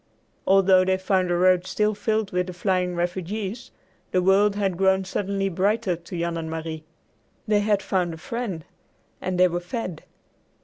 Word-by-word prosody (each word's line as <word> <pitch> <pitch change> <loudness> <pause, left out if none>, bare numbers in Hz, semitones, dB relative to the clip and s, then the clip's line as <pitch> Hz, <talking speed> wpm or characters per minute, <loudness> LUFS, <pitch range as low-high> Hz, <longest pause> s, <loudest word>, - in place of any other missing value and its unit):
Although 190 -1 +5
they 185 0 +1
found 185 -1 +1
the 175 - +2
road 180 0 +3
still 210 0 +1
filled 215 0 -1
with 180 0 0
the 180 - -6
flying 180 0 0
refugees, 190 +7 -3 0.4
the 185 -1 +1
world 200 +2 +4
had 195 -3 0
grown 190 +1 +2
suddenly 195 0 -1
brighter 195 +1 +1
to 170 +1 -8
Jan 170 0 -1
and 160 -1 -4
Marie. 160 -1 -5 0.6
They 210 -1 +3
had 205 -1 +1
found 180 -3 0
a - - -11
friend 200 -4 -5 0.6
and 185 -1 -2
they 185 - +7
were 175 0 -2
fed. 180 -2 -5
185 Hz, 170 wpm, -24 LUFS, 175-200 Hz, 0.6 s, they